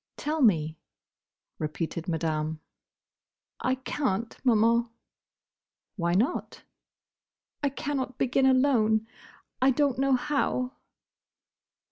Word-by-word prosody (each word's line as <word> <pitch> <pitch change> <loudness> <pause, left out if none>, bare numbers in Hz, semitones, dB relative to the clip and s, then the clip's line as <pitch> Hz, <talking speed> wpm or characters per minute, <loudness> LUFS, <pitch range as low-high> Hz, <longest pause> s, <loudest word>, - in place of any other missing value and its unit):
"Tell 310 +1 -2
me," 160 - +3 0.8
repeated 160 +2 -3
Madame. 160 -2 -1 1.0
"I 260 - +1
can't, 235 -5 -2
Maman." 235 -1 +3 1.1
"Why 170 -3 0
not?" 240 - -1 1.0
"I 285 - +2
cannot 270 -1 -3
begin 265 +1 +2
alone: 240 -5 +3 0.6
I 260 - +5
don't 270 -1 +1
know 275 0 +3
how." 255 -1 0
240 Hz, 85 wpm, -28 LUFS, 175-270 Hz, 1.1 s, I